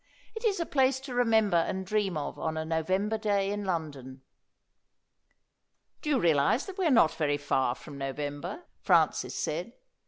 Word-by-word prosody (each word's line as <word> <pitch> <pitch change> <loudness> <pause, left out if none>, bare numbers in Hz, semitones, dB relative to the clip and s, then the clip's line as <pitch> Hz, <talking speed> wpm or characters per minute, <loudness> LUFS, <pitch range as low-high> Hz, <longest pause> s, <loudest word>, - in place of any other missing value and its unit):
"It 445 - -7
is 410 -5 +1
a 335 - 0
place 265 -3 +2
to 265 -2 -7
remember 220 -6 +3
and 185 +3 -1
dream 195 -3 0
of 145 - -5
on 160 0 -2
a 160 - -2
November 185 +7 0
day 200 -2 +1
in 205 0 -3
London." 140 -7 -4 1.8
"Do 305 - -4
you 280 -4 +3
realise 160 - +2
that 385 -1 -8
we 365 - +2
are - - +3
not 230 - +5
very 145 -2 0
far 135 -3 0
from 140 0 -11
November?" 145 - -4 0.2
Francis - - +2
said. - - -3
190 Hz, 165 wpm, -29 LUFS, 150-245 Hz, 1.8 s, not